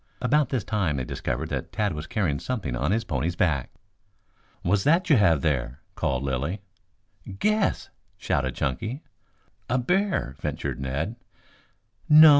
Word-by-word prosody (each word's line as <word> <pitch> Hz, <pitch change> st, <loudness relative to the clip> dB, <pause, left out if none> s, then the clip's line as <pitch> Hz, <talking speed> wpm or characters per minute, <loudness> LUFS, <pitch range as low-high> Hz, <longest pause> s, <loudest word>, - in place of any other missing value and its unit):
About 135 Hz, +2 st, +2 dB
this 125 Hz, -6 st, 0 dB
time 95 Hz, -9 st, 0 dB
they 65 Hz, -, -1 dB
discovered -, -, -3 dB
that -, -, -3 dB
Tad 105 Hz, -3 st, 0 dB
was 75 Hz, +1 st, -5 dB
carrying 95 Hz, -, 0 dB
something 100 Hz, -, -3 dB
on 70 Hz, +6 st, 0 dB
his 115 Hz, +2 st, +1 dB
pony's 80 Hz, +3 st, -1 dB
back. 80 Hz, -8 st, +1 dB, 0.9 s
"What's 95 Hz, +2 st, +2 dB
that 165 Hz, +3 st, +3 dB
you 145 Hz, -, +7 dB
have 85 Hz, -9 st, +4 dB
there?" 65 Hz, -4 st, 0 dB
called 65 Hz, 0 st, -1 dB
Lilly. 70 Hz, +8 st, -1 dB, 0.8 s
"Guess," 215 Hz, -, +1 dB, 0.3 s
shouted 70 Hz, -10 st, 0 dB
Chunky. 110 Hz, -, -2 dB, 0.7 s
"A 125 Hz, -, +2 dB
bear," 180 Hz, -, +1 dB
ventured 75 Hz, -3 st, -3 dB
Ned. 70 Hz, -, -2 dB, 0.9 s
"No. 155 Hz, +1 st, +10 dB
95 Hz, 140 wpm, -26 LUFS, -, 0.9 s, No